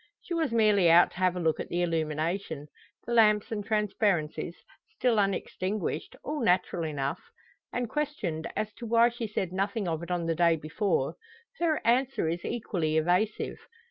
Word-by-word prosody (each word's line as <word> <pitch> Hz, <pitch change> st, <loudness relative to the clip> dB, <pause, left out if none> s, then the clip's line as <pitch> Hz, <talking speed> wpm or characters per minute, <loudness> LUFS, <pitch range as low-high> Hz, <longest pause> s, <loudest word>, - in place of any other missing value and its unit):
She 350 Hz, -, -6 dB
was 325 Hz, -6 st, 0 dB
merely 210 Hz, -6 st, +4 dB
out 170 Hz, +2 st, +6 dB
to -, -, -14 dB
have 185 Hz, -1 st, +2 dB
a -, -, -2 dB
look 160 Hz, -2 st, +1 dB
at -, -, -5 dB
the 175 Hz, +1 st, 0 dB
illumination 160 Hz, -1 st, -2 dB, 0.4 s
the 240 Hz, -, -3 dB
lamps 215 Hz, -2 st, +4 dB
and 210 Hz, -2 st, -2 dB
transparencies, 200 Hz, -6 st, 0 dB, 0.4 s
still 240 Hz, -4 st, +2 dB
unextinguished 195 Hz, -2 st, -2 dB
all 300 Hz, +1 st, -3 dB
natural 180 Hz, -6 st, +1 dB
enough. 140 Hz, -3 st, -2 dB, 0.5 s
And 245 Hz, -1 st, -2 dB
questioned 220 Hz, -, -2 dB
as 215 Hz, 0 st, -2 dB
to 235 Hz, -, -5 dB
why 230 Hz, +1 st, +5 dB
she 235 Hz, -1 st, -5 dB
said 190 Hz, -4 st, -3 dB
nothing 200 Hz, +1 st, -1 dB
of 160 Hz, -1 st, -2 dB
it 170 Hz, -, -7 dB
on 175 Hz, -2 st, -1 dB
the 165 Hz, -, +1 dB
day 170 Hz, 0 st, +4 dB
before, 155 Hz, -1 st, -1 dB, 0.4 s
her 325 Hz, -3 st, +2 dB
answer 250 Hz, -4 st, +2 dB
is 170 Hz, +2 st, -2 dB
equally 170 Hz, -9 st, -1 dB
evasive. 180 Hz, +7 st, 0 dB
190 Hz, 170 wpm, -28 LUFS, 165-225 Hz, 0.5 s, out